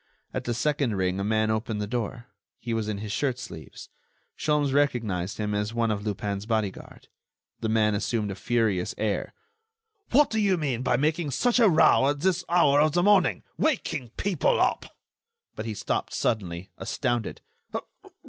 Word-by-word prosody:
At - - -3
the 120 - -1
second 135 -3 0
ring 95 0 0
a - - -1
man 110 +1 +1
opened 110 0 -2
the 105 - -1
door; 120 +2 -3 0.3
he 120 - -4
was 110 -2 -1
in 105 -2 -2
his 105 0 -5
shirt 130 +2 0
sleeves. - - -9 0.5
Sholmes 150 -2 +1
recognized 110 -10 0
him 105 -1 -2
as 105 +2 -2
one 115 -1 +1
of 100 -1 -2
Lupin's 100 0 -3
bodyguard. 110 -4 -3 0.5
The 110 - -2
man 110 -1 +3
assumed 105 0 -1
a - - -5
furious 110 -4 0
air: 105 -1 -2 0.7
"What 285 +3 +4
do 220 - 0
you 195 -3 +3
mean 135 -7 -1
by 125 -1 +2
making 155 +3 0
such 245 - +2
a 225 -4 +6
row 150 -4 +5
at 145 0 -2
this 185 0 +1
hour 150 -5 +5
of 155 -1 +3
the 175 +1 +2
morning... 205 -1 +4 0.2
waking 225 - 0
people 205 - +1
up...." - - +1 0.7
But 110 - -5
he 110 - -3
stopped - - -2
suddenly, 95 -3 -2
astounded. 120 -4 -2
115 Hz, 170 wpm, -26 LUFS, 105-150 Hz, 0.7 s, a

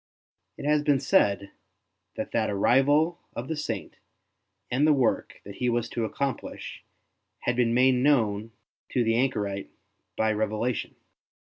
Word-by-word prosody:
It - - -7
has 150 0 +3
been 145 -2 +2
said 100 -6 +2 0.6
that - - -4
that - - +1
arrival 145 - +3 0.2
of 120 - -5
the 160 - -2
Saint 150 - -5 0.7
and 140 +5 +3
the 155 - +6
work 130 -5 0
that 100 0 -10
he 125 - 0
was 120 0 0
to 115 -2 -2
accomplish 135 +3 -4 0.6
had 125 - 0
been 120 -1 +2
made 130 +1 +5
known 115 -5 +2 0.4
to 125 - +2
the 115 0 +2
anchorite 105 -6 -1 0.5
by 110 0 +2
revelation. 110 +2 -2
125 Hz, 140 wpm, -27 LUFS, 110-140 Hz, 0.7 s, the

